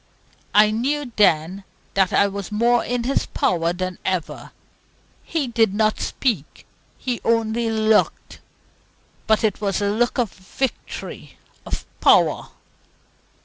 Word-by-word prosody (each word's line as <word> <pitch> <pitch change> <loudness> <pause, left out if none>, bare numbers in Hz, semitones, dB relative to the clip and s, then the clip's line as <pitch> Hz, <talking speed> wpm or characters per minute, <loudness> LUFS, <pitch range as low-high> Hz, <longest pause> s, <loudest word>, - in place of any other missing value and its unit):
I 210 0 +6
knew 265 +4 -1
then 185 -1 +2 0.3
that 190 -2 +2
I 200 - +4
was 200 0 -6
more 235 +3 +2
in 245 0 -2
his 270 +3 0
power 170 -2 0
than 185 0 -4
ever. 185 -4 -3 0.7
He 320 -4 -2
did 225 -4 +1
not 215 0 +1
speak 205 - -2 0.3
he 250 -2 -3
only 230 0 +1
looked; 220 -1 +1 0.9
but 220 0 +3
it 215 -2 0
was 195 -3 0
a 205 0 0
look 240 +5 0
of 235 -6 0
victory, 230 +7 -5 0.3
of - - -4 0.2
power. - - +4
215 Hz, 125 wpm, -22 LUFS, 195-235 Hz, 0.9 s, I